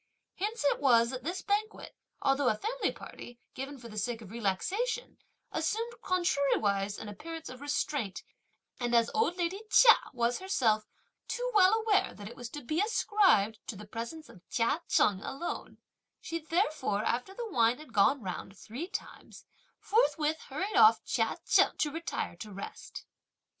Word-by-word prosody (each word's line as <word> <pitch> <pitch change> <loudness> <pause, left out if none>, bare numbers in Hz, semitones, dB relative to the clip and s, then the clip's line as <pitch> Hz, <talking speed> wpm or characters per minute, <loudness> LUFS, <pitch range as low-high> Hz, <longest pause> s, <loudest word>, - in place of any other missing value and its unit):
Hence 425 0 -3
it 285 - +3
was 235 -4 +4
that 255 -1 -6
this 350 +5 -3
banquet, 420 +2 -2 0.3
although 275 -1 +3
a 215 - 0
family 485 - -1
party, 240 0 -11
given 275 +2 -6
for 235 -2 -11
the 215 -2 -5
sake 230 +2 -2
of 195 - -12
relaxation, 380 - -2 0.3
assumed 440 +9 -1
contrariwise 270 - +1
an - - -7
appearance 320 +11 -7
of 255 +1 -10
restraint, 290 -7 -2 0.6
and 240 -1 0
as 230 0 +4
old 435 -5 +1
lady 360 +3 -1
Chia 460 -1 +9 0.2
was 240 0 0
herself 235 - +1 0.4
too - - -2
well 400 0 +6
aware 435 -3 +2
that 205 -1 -9
it 235 - -9
was 245 -2 -7
to 290 +2 -8
be 310 +8 0
ascribed 390 - +3
to - - -4
the 210 +2 -9
presence 235 +9 -6
of 180 - -15
Chia 240 +8 +1
Cheng 195 -2 +3
alone, 275 +9 -5 0.4
she 330 - -4
therefore, 310 - 0
after 250 +11 -1
the 475 0 -4
wine 235 -2 +3
had 300 -5 -13
gone 230 +5 +3
round 190 +1 -6
three 250 - -6
times, 435 +3 -8 0.3
forthwith 320 -9 +1
hurried 375 +10 -3
off 435 0 +6
Chia - - 0
Cheng - - +4
to 300 - 0
retire 325 - -4
to 210 +4 -8
rest. 195 0 -8
285 Hz, 165 wpm, -31 LUFS, 230-375 Hz, 0.6 s, Chia